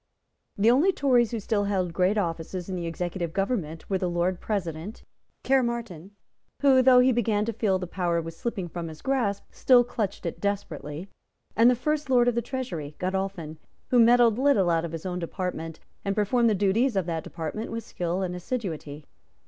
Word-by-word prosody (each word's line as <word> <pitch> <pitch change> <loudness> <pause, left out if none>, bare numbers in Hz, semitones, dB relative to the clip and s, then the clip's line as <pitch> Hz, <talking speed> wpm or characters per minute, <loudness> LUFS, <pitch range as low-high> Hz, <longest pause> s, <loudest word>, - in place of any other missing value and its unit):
The 215 +3 +5
only 300 +10 +4
Tories 250 - +2
who 230 - -3
still 205 -1 0
held 185 -4 -1
great 185 +4 +2
offices 170 -1 -3
in 190 - -4
the 170 -2 -3
executive 170 0 -3
government 190 -6 -2
were 190 -1 0
the 180 - -1
Lord 175 +1 -1
President, 180 -1 -4 0.4
Caermarthen, 235 -8 -1 0.5
who, 265 -2 +6
though 250 -1 +7
he 260 +1 +4
began 220 -3 +1
to 230 - -2
feel 205 -3 +1
that 185 - -4
power 175 -1 -1
was 165 0 -6
slipping 200 -3 -4
from 170 0 -6
his 155 -1 -10
grasp, 235 -7 0
still 250 -2 +5
clutched 210 -6 -4
it 170 - -4
desperately, 175 -5 -4 0.5
and 230 +2 +6
the 250 - +3
first 300 +3 -2
Lord 245 -2 +4
of 245 - +3
the 235 - 0
Treasury, 230 - -5
Godolphin, 185 -4 -3 0.3
who 250 - +4
meddled 235 -1 +5
little 235 -11 +3
out 165 0 +1
of 165 - -6
his 165 +1 -7
own 180 -1 -3
department, 170 -2 -4 0.2
and 200 -1 -1
performed 230 +3 +2
the 215 - +2
duties 205 +6 +2
of 190 -3 +1
that 165 -2 -3
department 165 +7 -5
with 230 0 -4
skill 180 -2 -3
and 180 -1 -3
assiduity. 165 - -5
195 Hz, 190 wpm, -26 LUFS, 170-235 Hz, 0.5 s, though